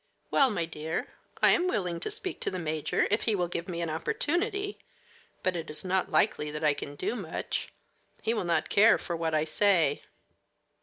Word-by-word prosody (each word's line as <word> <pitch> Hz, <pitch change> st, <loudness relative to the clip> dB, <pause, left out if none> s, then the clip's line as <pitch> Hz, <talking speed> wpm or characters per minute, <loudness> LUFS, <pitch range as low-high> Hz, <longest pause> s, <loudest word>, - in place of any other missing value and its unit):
"Well, 275 Hz, -2 st, +5 dB
my 175 Hz, -7 st, -1 dB
dear, 160 Hz, 0 st, -4 dB, 0.3 s
I -, -, +8 dB
am 355 Hz, -, +3 dB
willing 180 Hz, -, -1 dB
to -, -, -3 dB
speak 420 Hz, -3 st, -5 dB
to -, -, 0 dB
the 185 Hz, -, -4 dB
major, 155 Hz, -3 st, 0 dB
if 210 Hz, -, +1 dB
he 220 Hz, -, +3 dB
will 180 Hz, -2 st, 0 dB
give 170 Hz, 0 st, -4 dB
me 170 Hz, -1 st, -3 dB
an 170 Hz, -, -2 dB
opportunity; 395 Hz, -, -1 dB, 0.6 s
but 185 Hz, -1 st, +1 dB
it 165 Hz, -2 st, -4 dB
is 150 Hz, +4 st, -6 dB
not 185 Hz, 0 st, +1 dB
likely 150 Hz, -7 st, +2 dB
that 150 Hz, +1 st, -5 dB
I 150 Hz, -1 st, +5 dB
can 145 Hz, 0 st, -7 dB
do 225 Hz, -, -2 dB
much. 185 Hz, -9 st, -4 dB, 0.5 s
He 225 Hz, -, +2 dB
will 220 Hz, -, -1 dB
not 170 Hz, -1 st, +1 dB
care 220 Hz, +3 st, +6 dB
for 170 Hz, -, -4 dB
what 165 Hz, -1 st, -1 dB
I 155 Hz, -, +3 dB
say." 160 Hz, -3 st, +3 dB
175 Hz, 200 wpm, -29 LUFS, 160-220 Hz, 0.6 s, I